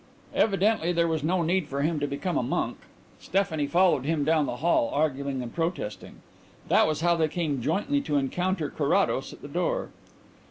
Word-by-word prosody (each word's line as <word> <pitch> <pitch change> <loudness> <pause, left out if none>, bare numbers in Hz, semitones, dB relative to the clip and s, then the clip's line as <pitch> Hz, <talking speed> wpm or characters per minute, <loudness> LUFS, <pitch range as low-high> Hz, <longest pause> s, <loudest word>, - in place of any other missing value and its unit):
Evidently 200 -3 +2
there 170 -1 +2
was 160 -2 -1
no 175 +2 +1
need 175 0 +1
for 140 0 -2
him 155 0 0
to 145 - -1
become 145 +5 -3
a - - +2
monk: 120 - -2 0.4
Stephanie 165 -6 0
followed 170 -3 +3
him 155 0 0
down 155 -1 +2
the - - -3
hall, 160 -7 +2
arguing 140 -3 -1
and 120 - -8
protesting. 165 - -4 0.5
That - - +5
was 155 0 -1
how 170 0 +3
they 160 -2 +2
came 155 -5 -2
jointly 275 - 0
to 150 - -2
encounter 180 +8 -1
Carrados - - +1
at - - -14
the - - -6
door. - - -1
160 Hz, 185 wpm, -27 LUFS, 145-180 Hz, 0.5 s, That